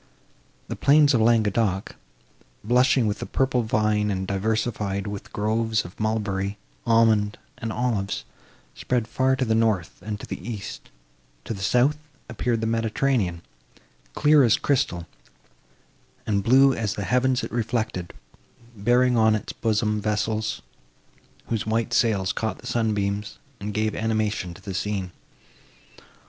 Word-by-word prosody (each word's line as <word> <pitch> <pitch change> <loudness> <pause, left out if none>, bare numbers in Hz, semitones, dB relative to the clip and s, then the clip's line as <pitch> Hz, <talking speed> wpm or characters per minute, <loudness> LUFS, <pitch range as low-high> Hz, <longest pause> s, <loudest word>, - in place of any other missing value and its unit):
The - - -4
plains 145 +1 +5
of 115 - +3
Languedoc, 110 -3 +1 0.7
blushing 125 +2 +3
with 105 -1 -1
the - - -5
purple 130 -2 +1
vine 105 -1 +1
and 95 -1 -2
diversified 100 0 -1
with 100 -1 -6
groves 110 0 0
of 90 - -12
mulberry, 105 -2 -1 0.3
almond 110 -2 +3 0.2
and 115 -3 -3
olives, 110 - -1 0.5
spread 120 -3 -1
far 130 +1 +1
to 130 - -1
the 110 - +1
north 110 -6 0
and 105 +2 -4
the - - -7
east; 110 -4 -7 0.6
to - - -3
the 100 - -8
south, 125 +9 +3 0.3
appeared 120 -1 -1
the - - -1
Mediterranean, 115 -5 0 0.7
clear 150 -1 +5
as 115 -3 +4
crystal, 90 - 0 1.2
and 100 -2 +1
blue 135 +5 +5
as 110 -2 -2
the - - -3
heavens 125 0 +1
it - - -5
reflected, 110 -5 -2 0.6
bearing 120 +4 +3
on 110 -1 +4
its 105 - -5
bosom 105 -1 0
vessels, 110 +1 -1 0.9
whose 110 -2 -2
white 115 +2 0
sails 100 -6 +2
caught 110 -1 -2
the - - -15
sunbeams, 105 -2 -1 0.2
and 105 +1 -4
gave 110 0 0
animation 110 -5 -1
to - - -15
the 100 - -5
scene. 95 -1 -2
110 Hz, 135 wpm, -24 LUFS, 105-120 Hz, 1.2 s, plains